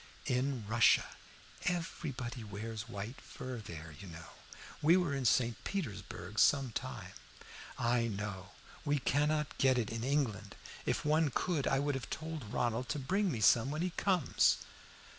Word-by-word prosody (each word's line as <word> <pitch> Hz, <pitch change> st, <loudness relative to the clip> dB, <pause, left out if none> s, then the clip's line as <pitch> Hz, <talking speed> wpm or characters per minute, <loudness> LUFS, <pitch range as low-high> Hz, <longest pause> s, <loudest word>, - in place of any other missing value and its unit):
"In 125 Hz, -2 st, 0 dB
Russia. 115 Hz, +1 st, +5 dB, 0.6 s
Everybody 145 Hz, -8 st, -3 dB
wears 110 Hz, +2 st, -6 dB
white 105 Hz, +4 st, -6 dB
fur 130 Hz, -1 st, -7 dB
there, 80 Hz, -6 st, -8 dB
you 100 Hz, -, -9 dB
know. 85 Hz, 0 st, -10 dB, 0.5 s
We 165 Hz, +4 st, +6 dB
were 175 Hz, -6 st, +1 dB
in 135 Hz, -2 st, -2 dB
St. 120 Hz, -1 st, +2 dB
Petersburg 100 Hz, -, -4 dB
some 135 Hz, -3 st, +4 dB
time." -, -, -5 dB, 0.7 s
"I 120 Hz, 0 st, +2 dB
know. 100 Hz, -3 st, -4 dB, 0.3 s
We 145 Hz, -1 st, +2 dB
cannot 150 Hz, +3 st, +1 dB
get 130 Hz, -1 st, +5 dB
it 115 Hz, -3 st, 0 dB
in 115 Hz, 0 st, -3 dB
England. 120 Hz, -8 st, 0 dB, 0.3 s
If -, -, 0 dB
one 155 Hz, 0 st, +3 dB
could 150 Hz, +2 st, 0 dB
I 135 Hz, -, +3 dB
would 145 Hz, +1 st, +1 dB
have 135 Hz, -2 st, -4 dB
told 155 Hz, -9 st, -5 dB
Ronald 120 Hz, +1 st, 0 dB
to -, -, 0 dB
bring 190 Hz, +8 st, +1 dB
me 115 Hz, -6 st, -3 dB
some 115 Hz, +4 st, +5 dB
when 155 Hz, +4 st, -1 dB
he 180 Hz, -, 0 dB
comes." 185 Hz, -1 st, +3 dB
125 Hz, 155 wpm, -34 LUFS, 110-150 Hz, 0.7 s, We